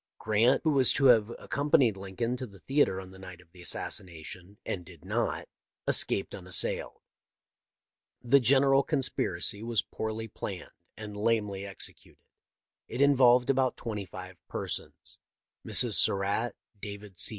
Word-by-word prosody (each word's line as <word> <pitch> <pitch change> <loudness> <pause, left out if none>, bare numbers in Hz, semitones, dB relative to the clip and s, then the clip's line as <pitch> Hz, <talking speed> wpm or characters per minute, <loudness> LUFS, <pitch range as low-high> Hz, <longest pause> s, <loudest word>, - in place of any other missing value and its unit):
Grant, 110 +4 +2
who 160 - +2
was 135 -3 +5
to 135 - +1
have 110 -1 0
accompanied 145 -6 +1
Lincoln 100 +5 -4
to 130 0 -6
the 100 -2 -15
theatre 135 -4 +1
on 95 -1 -10
the 95 - -14
night 90 -2 -11
of 85 -2 -21
the 90 0 -15
assassination, 90 +2 -2
and 90 - -4
did 85 -3 -16
not, - - -2 0.4
escaped - - +2
unassailed. - - -1 1.2
The 125 +3 +4
general 135 +2 +4
conspiracy 135 -7 0
was 115 -1 0
poorly 110 +1 -5
planned 100 -3 -7 0.3
and 105 -1 -8
lamely 105 -2 -1
executed. 100 - -6 0.6
It 120 - -6
involved 130 -3 +5
about 130 -2 0
twenty 105 -4 -5
five 90 0 -10
persons. - - -5 0.4
Mrs. - - +3
Surratt, 100 +4 +3 0.3
David 100 -2 -8
C. - - +4
110 Hz, 140 wpm, -29 LUFS, 95-125 Hz, 1.2 s, was